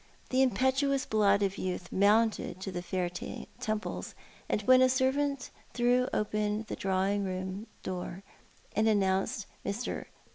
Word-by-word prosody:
The 260 +1 +4
impetuous 265 +1 +2
blood 205 -2 +3
of 195 0 -1
youth 180 -1 -3
mounted 210 -1 +2
to 195 - -4
the 175 -1 -3
fair 180 0 -1
temples, 210 +4 -5 0.3
and 210 - 0
when 255 +3 +6
a 255 - +6
servant 265 +1 +1 0.2
threw 245 +1 +3
open 210 +1 0
the - - -4
drawing 195 +1 0
room 190 +3 -4 0.2
door 185 0 -5 0.5
and 215 +1 +3
announced 195 -1 +1 0.2
i\lr. 200 +5 -3
210 Hz, 135 wpm, -30 LUFS, 190-250 Hz, 0.5 s, when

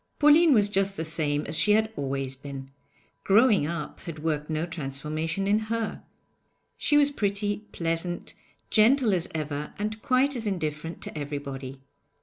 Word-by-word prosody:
Pauline 300 +3 +6
was 210 -6 +5
just 195 -1 0
the 160 - -2
same 150 -2 -1
as 155 - -4
she 210 +6 +4
had 220 +1 +2
always 135 -1 -3
been; 135 0 -8 0.5
'growing 210 - +4
up' 165 -2 -5
had 165 -2 -7
worked 150 -1 -1
no 155 +1 -1
transformation 155 +3 -3
in 205 +2 +3
her. 230 -1 -2 0.7
She 295 - +2
was 290 -1 +4
pretty, 205 -2 -1
pleasant, 165 +1 -3 0.4
gentle 230 +1 +5
as 175 -3 0
ever, 150 -1 -4
and 215 +1 -3
quite 265 +3 +2
as 230 -3 -1
indifferent 160 -3 -3
to - - -7
everybody. 140 -2 -5
170 Hz, 150 wpm, -27 LUFS, 150-215 Hz, 0.7 s, Pauline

